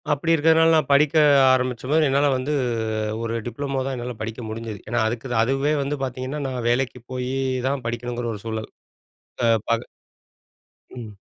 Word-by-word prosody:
அப்படி 145 +3 +1
இருக்கிறதனால 160 +1 +4
நான் 155 - +2
படிக்க 145 +2 +4 0.4
ஆரம்பிச்சம்போது, 130 +4 +1
என்னால 140 +2 +3
வந்து, 130 +4 -2 0.7
ஒரு 115 0 -2
டிப்ளமோ 135 +3 -3
தான் 135 -1 -2
என்னால 125 0 -5
படிக்க 115 +2 -5
முடிஞ்சது! 110 -2 -6
ஏன்னா 120 +2 0
அதுக்கு 120 +3 -4 0.2
அதுவே 135 +5 +1
வந்து 145 +2 -2
பார்த்தீங்கன்னா, 130 +3 -4
நான் 125 -3 -4
வேலைக்கு 125 0 0
போயி 125 0 -3 0.4
தான் 135 -1 -1
படிக்கணுங்குற 120 0 -3
ஒரு 105 - -8
சூழல்! 110 -1 -4 0.8
அ, - - +4 0.2
பக 115 0 +1 1.1
ம். 115 -4 -9
130 Hz, 150 wpm, -23 LUFS, 120-140 Hz, 1.1 s, இருக்கிறதனால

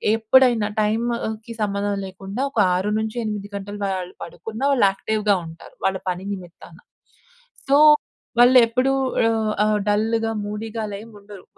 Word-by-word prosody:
ఎప్పుడైనా 225 -1 +3
టైంకి 225 0 -2
సంబంధం 200 0 -1
లేకుండా 195 +5 -6
ఒక 225 - -2 0.2
6-8 210 +1 -2
గంటలు 205 +1 -6
వాళ్ళు 185 -2 -3
పడుకున్నా 220 +7 -7
వాళ్ళు 220 -7 +4
యాక్టివ్‌గా 210 +1 0
ఉంటారు. 165 +1 -13
వాళ్ళ 190 0 +1
పని 180 +1 -4
నిమిత్తాన. 175 -3 -11 0.9
సో, 280 - +5 0.6
వాళ్ళు 245 +1 +7
ఎప్పుడు 255 +3 +1 0.3
ఆహ్, 220 -1 +1
ఆహ్, 210 -1 +1
డల్‌గా, 225 +2 +1
మూడీగా 220 +2 -5
అలా 200 - -6
ఏం 230 - -14
ఉండరు. 200 -2 -13
210 Hz, 130 wpm, -22 LUFS, 200-225 Hz, 0.9 s, వాళ్ళు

